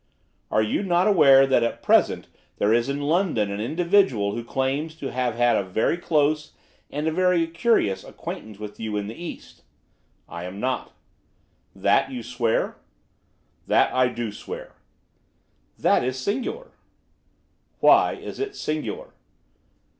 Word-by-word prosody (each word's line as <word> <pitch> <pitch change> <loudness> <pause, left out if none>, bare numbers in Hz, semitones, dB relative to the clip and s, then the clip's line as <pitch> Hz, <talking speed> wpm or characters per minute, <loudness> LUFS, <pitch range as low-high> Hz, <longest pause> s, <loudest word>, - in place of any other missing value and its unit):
'Are 110 - +2
you 110 - -1
not 180 -2 +2
aware 140 -10 +6
that 130 -2 +3
at 115 - -2
present - - +3 0.3
there 105 +2 +2
is 120 +3 +1
in 140 +1 -2
London 150 - +1
an 100 +1 -4
individual 160 - +2
who 120 - -4
claims 135 +6 -2
to 140 -4 -6
have 125 -2 -1
had 120 0 +3
a - - +2
very 95 - 0
close, 150 -3 0 0.4
and 150 +2 -3
a - - +2
very 180 0 +2
curious, 165 - +1
acquaintance 110 -2 -8
with 105 0 -9
you 110 -2 -3
in 100 - -2
the 110 - -6
East?' 170 +6 -9 0.7
'I 85 0 -7
am 95 +2 -7
not.' 125 0 -2 0.8
'That - - +2
you 125 -3 -6
swear?' 120 -1 -1 0.9
'That - - +3
I 130 0 +3
do 120 -3 -4
swear.' - - -8 1.0
'That - - +3
is 130 +1 -2
singular.' 250 - -3 1.1
'Why - - +5
is - - -8
it 410 0 -3
singular? 445 - -4
130 Hz, 145 wpm, -24 LUFS, 110-165 Hz, 1.1 s, aware